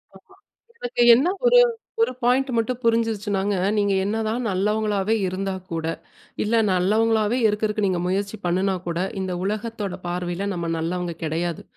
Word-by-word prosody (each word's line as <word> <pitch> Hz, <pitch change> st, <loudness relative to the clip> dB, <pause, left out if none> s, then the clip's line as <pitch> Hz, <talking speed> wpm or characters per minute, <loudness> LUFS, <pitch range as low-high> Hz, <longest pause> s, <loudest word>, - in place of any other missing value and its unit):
ஆமா. -, -, -13 dB, 0.6 s
எனக்கு 485 Hz, -, -1 dB
என்ன 270 Hz, +9 st, +2 dB, 0.2 s
ஒரே -, -, +7 dB, 0.4 s
ஒரு 455 Hz, -, +2 dB
பாயிண்ட் 260 Hz, +3 st, +2 dB
மட்டும் 230 Hz, +2 st, 0 dB
புரிஞ்சுருச்சுனாங்க, 210 Hz, -3 st, 0 dB, 0.2 s
நீங்க 205 Hz, -1 st, +2 dB
என்னதான் 220 Hz, +3 st, -1 dB
நல்லவங்களாகவே 210 Hz, +1 st, 0 dB
இருந்தா 190 Hz, +1 st, -3 dB, 0.2 s
கூட, 165 Hz, -1 st, -2 dB, 0.6 s
இல்ல 225 Hz, +2 st, +1 dB, 0.2 s
நல்லவங்களாகவே 215 Hz, +5 st, +2 dB
இருக்குறதுக்கு 210 Hz, 0 st, 0 dB
நீங்க 185 Hz, -2 st, 0 dB
முயற்சி 200 Hz, +3 st, -1 dB
பண்ணுனா 185 Hz, +2 st, +1 dB
கூட, 170 Hz, -1 st, -2 dB, 0.2 s
இந்த 190 Hz, -1 st, -3 dB
உலகத்தோட 210 Hz, -1 st, -3 dB
பார்வையில 175 Hz, +2 st, -3 dB
நம்ம 170 Hz, -2 st, -3 dB
நல்லவங்க 175 Hz, +1 st, -2 dB
கிடையாது. 165 Hz, +1 st, -2 dB
205 Hz, 135 wpm, -23 LUFS, 180-225 Hz, 0.6 s, ஒரே